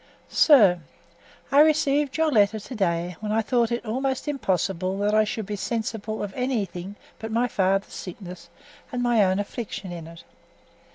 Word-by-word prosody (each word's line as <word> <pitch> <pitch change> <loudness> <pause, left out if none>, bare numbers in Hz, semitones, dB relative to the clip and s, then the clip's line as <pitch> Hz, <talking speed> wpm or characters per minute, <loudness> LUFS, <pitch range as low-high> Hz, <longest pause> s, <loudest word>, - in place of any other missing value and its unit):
SIR, 205 - +6 0.7
I 280 - +5
received 295 -2 +3
your 320 -1 +2
letter 215 -2 +3
to 250 +5 -9
day, 175 -3 -1
when 215 -1 -4
I 220 +1 +1
thought 240 0 +1
it 235 -1 -2
almost 260 +5 -2
impossible 190 - -1
that 205 +1 0
I 215 0 +5
should 215 0 -4
be 210 +1 -4
sensible 220 0 -3
of 200 -2 -5
anything 205 -7 -3 0.2
but 220 0 -6
my 235 +2 +1
father's 195 -2 0
sickness 180 -1 -9 0.4
and 250 -2 -2
my 240 -3 +4
own 185 0 +2
affliction 205 -2 -5
in 170 -2 -7
it. 165 0 -12
215 Hz, 165 wpm, -25 LUFS, 190-245 Hz, 0.7 s, SIR